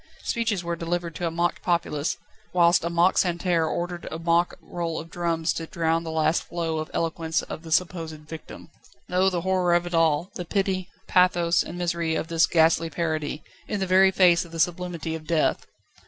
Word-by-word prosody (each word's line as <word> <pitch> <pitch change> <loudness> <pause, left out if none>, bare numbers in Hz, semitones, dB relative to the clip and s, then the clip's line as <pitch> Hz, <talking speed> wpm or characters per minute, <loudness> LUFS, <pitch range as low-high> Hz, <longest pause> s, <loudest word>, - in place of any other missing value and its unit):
Speeches 225 -6 -1
were 170 0 -2
delivered 170 0 -3
to 175 - -1
a - - 0
mock 170 +1 -1
populace, 170 -3 -1 0.4
whilst 170 -1 +4
a 170 - -1
mock 170 +2 +3
Santerre 175 -2 +1
ordered 175 +1 -3
a 160 - -5
mock 170 +1 +1
roll 170 -2 -4
of 165 +1 -10
drums 170 -2 0
to 165 - -5
drown 165 -1 0
the 165 - -5
last 160 0 +1
flow 165 -2 -3
of 155 - -5
eloquence 165 -1 -1
of - - -7
the 165 -1 -10
supposed 160 -3 -1
victim. 160 0 -10 0.4
Oh! 185 +1 +3
the 180 -2 -2
horror 180 -1 +2
of 175 0 +1
it 175 - -6
all 165 +1 +2
the 180 - -5
pity, 190 0 -1 0.2
pathos, 175 -2 +3
and 175 - -6
misery 170 -2 -1
of 160 - -3
this 165 0 +3
ghastly 165 0 +3
parody, 155 -3 -2 0.2
in 210 - -2
the 190 - 0
very 190 +1 +5
face 180 -2 +4
of 170 - -14
the 165 - -7
sublimity 170 -1 -1
of 155 -1 -7
death! 165 -2 +1
170 Hz, 195 wpm, -25 LUFS, 160-175 Hz, 0.4 s, very